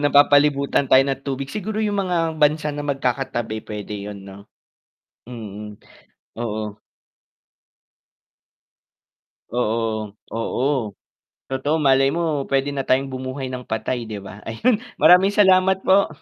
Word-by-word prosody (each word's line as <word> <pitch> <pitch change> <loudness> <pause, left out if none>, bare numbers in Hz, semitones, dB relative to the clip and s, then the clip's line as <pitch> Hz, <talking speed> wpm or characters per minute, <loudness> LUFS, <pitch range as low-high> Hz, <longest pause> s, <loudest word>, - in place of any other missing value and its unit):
napapalibutan 145 -1 +3
tayo 130 +1 +7
ng 135 -1 -2
tubig, 135 -1 -3
siguro 215 +1 -4
yung 205 -1 -1
mga 165 -2 0
bansa 150 0 +2
na 145 - -4
magkakatabi 125 -5 -2
pwede 105 -1 -6 0.2
yun, 100 - -8
'no, 100 +1 -13 0.8
mm, 105 -3 -8 0.7
oo. 110 -2 -4 2.7
Oo, 110 -3 -2 0.2
oo, 120 +4 -1 0.8
totoo 135 +3 0
malay 135 0 +5
mo, 170 - 0 0.3
pwede 135 +1 +1
na 135 -1 -3
tayong 135 +1 +2
bumuhay 130 +1 -5
ng 125 -1 -6
patay, 115 +2 -2
'di 105 -2 -5
ba, 100 +1 -10
ayun, 215 - +1 0.2
maraming 190 +3 +6
salamat 190 -1 +4
po. 195 +1 +4
135 Hz, 120 wpm, -22 LUFS, 110-150 Hz, 2.7 s, tayo